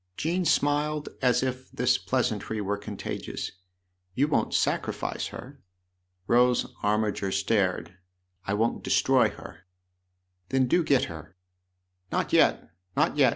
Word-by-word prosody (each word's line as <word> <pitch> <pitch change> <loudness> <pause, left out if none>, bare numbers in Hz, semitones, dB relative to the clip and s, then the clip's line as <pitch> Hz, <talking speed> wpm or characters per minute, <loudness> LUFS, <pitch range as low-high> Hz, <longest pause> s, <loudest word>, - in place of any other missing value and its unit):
Jean 175 +3 0
smiled 150 0 +1
as 125 0 +3
if 130 0 -3
this - - +2
pleasantry 110 - -1
were 100 0 -1
contagious. 100 0 -5 0.3
" 90 0 -46
You 140 +3 +3
won't 150 - +1
sacrifice - - -1
her? 135 +2 -10 0.3
" 90 0 -49
Rose 125 +1 +4 0.2
Armiger 105 -2 0
stared. 95 -3 0 0.2
" 90 0 -31
I 100 - +1
won't 115 +3 0
destroy - - +3
her." 90 - -12 0.8
"Then 130 -1 +3
do 170 +8 +2
get 140 -4 +3
her." 80 +2 -8 0.4
" 90 0 -46
Not - - -1
yet, - - +3 0.3
not - - +2
yet - - +5
105 Hz, 140 wpm, -27 LUFS, 90-130 Hz, 0.8 s, yet